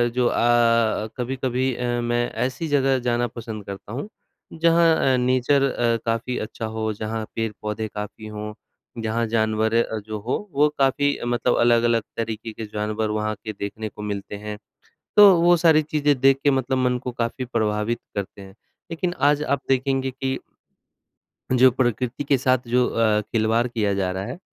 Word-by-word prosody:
जो 125 Hz, -1 st, +3 dB
अ, 115 Hz, -2 st, +2 dB
कभी-कभी 130 Hz, +1 st, -1 dB
अ, 125 Hz, -, -4 dB, 0.2 s
मैं 120 Hz, 0 st, 0 dB
ऐसी 130 Hz, +6 st, -2 dB
जगह 135 Hz, -3 st, +2 dB
जाना 120 Hz, 0 st, +1 dB
पसंद 110 Hz, -3 st, -8 dB
करता 100 Hz, +2 st, -8 dB
हूँ 140 Hz, +10 st, -4 dB, 0.5 s
जहाँ 165 Hz, -4 st, +3 dB
अ, -, -, +1 dB
नेचर 130 Hz, +3 st, +2 dB
अ, 120 Hz, -1 st, +1 dB
काफ़ी 115 Hz, +2 st, -1 dB
अच्छा 110 Hz, +1 st, -5 dB
हो 110 Hz, 0 st, -1 dB
जहाँ 110 Hz, +1 st, -4 dB
पेड़-पौधे 110 Hz, -1 st, -3 dB
काफ़ी 105 Hz, +1 st, -6 dB
हों 105 Hz, 0 st, -6 dB, 0.5 s
जहाँ 110 Hz, +1 st, -1 dB
जानवर 110 Hz, 0 st, +1 dB
अ, 110 Hz, -1 st, +1 dB
जो 110 Hz, +1 st, -6 dB
हो, 130 Hz, -, -3 dB
वो 150 Hz, +2 st, +4 dB
काफ़ी 140 Hz, +1 st, +2 dB
मतलब 120 Hz, 0 st, +1 dB
अलग-अलग 120 Hz, -1 st, +3 dB
तरीक़े 115 Hz, 0 st, -4 dB
के 110 Hz, 0 st, -6 dB
जानवर 105 Hz, +1 st, -2 dB
वहाँ 110 Hz, 0 st, -2 dB
के 110 Hz, -, -4 dB
देखने 110 Hz, +2 st, -4 dB
को 105 Hz, -, -11 dB
मिलते 105 Hz, -1 st, -5 dB
हैं। 105 Hz, 0 st, -6 dB, 0.6 s
तो 205 Hz, -2 st, +10 dB
वो 175 Hz, +1 st, +6 dB
सारी 160 Hz, -2 st, +5 dB
चीज़ें 145 Hz, -2 st, +1 dB
देख 135 Hz, 0 st, +5 dB
के 145 Hz, -, +4 dB
मतलब 130 Hz, 0 st, 0 dB
मन 125 Hz, -1 st, +1 dB
को 125 Hz, -, -3 dB
काफ़ी 120 Hz, +2 st, -3 dB
प्रभावित 110 Hz, -1 st, -1 dB, 0.2 s
करते 100 Hz, 0 st, -5 dB
हैं, 95 Hz, 0 st, -12 dB, 0.4 s
लेकिन 175 Hz, +2 st, -2 dB
आज 150 Hz, 0 st, +2 dB
आप 140 Hz, -1 st, 0 dB
देखेंगे 135 Hz, 0 st, +1 dB
कि 130 Hz, 0 st, -3 dB, 1.2 s
जो 130 Hz, +1 st, +6 dB
प्रकृति 125 Hz, +2 st, -1 dB
के 140 Hz, 0 st, +3 dB
साथ 130 Hz, +1 st, +2 dB
जो 125 Hz, +1 st, +3 dB
अ, 110 Hz, -2 st, +2 dB
खिलवाड़ 110 Hz, +2 st, 0 dB
किया 110 Hz, -4 st, 0 dB
जा 95 Hz, -2 st, -1 dB
रहा 95 Hz, +1 st, -4 dB
है 125 Hz, +9 st, -6 dB
120 Hz, 170 wpm, -23 LUFS, 110-130 Hz, 1.2 s, तो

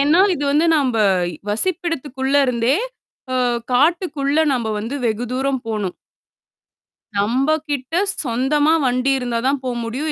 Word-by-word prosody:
ஏன்னா 300 Hz, +6 st, +4 dB
இது 290 Hz, -, -3 dB
வந்து 310 Hz, +3 st, +3 dB
நம்ப, 260 Hz, -5 st, +1 dB, 0.5 s
வசிப்பிடதுக்குள்ள 280 Hz, -, -2 dB
இருந்தே 245 Hz, +2 st, +1 dB, 0.6 s
அ -, -, +1 dB, 0.4 s
காட்டுக்குள்ள 300 Hz, +1 st, +2 dB
நம்ப 235 Hz, -3 st, -2 dB
வந்து 230 Hz, +6 st, -5 dB
வெகு 230 Hz, +1 st, 0 dB
தூரம் 265 Hz, 0 st, -1 dB
போணும். 210 Hz, -5 st, -3 dB, 1.2 s
நம்ப 245 Hz, +8 st, +1 dB, 0.2 s
கிட்ட 285 Hz, +3 st, -3 dB, 0.3 s
சொந்தமா 285 Hz, +6 st, +2 dB
வண்டி 255 Hz, +2 st, +1 dB
இருந்தா 240 Hz, -2 st, -2 dB
தான் 275 Hz, 0 st, +1 dB
போ 255 Hz, -, -2 dB, 0.2 s
முடியும். 275 Hz, +7 st, -3 dB
265 Hz, 125 wpm, -20 LUFS, 245-295 Hz, 1.2 s, ஏன்னா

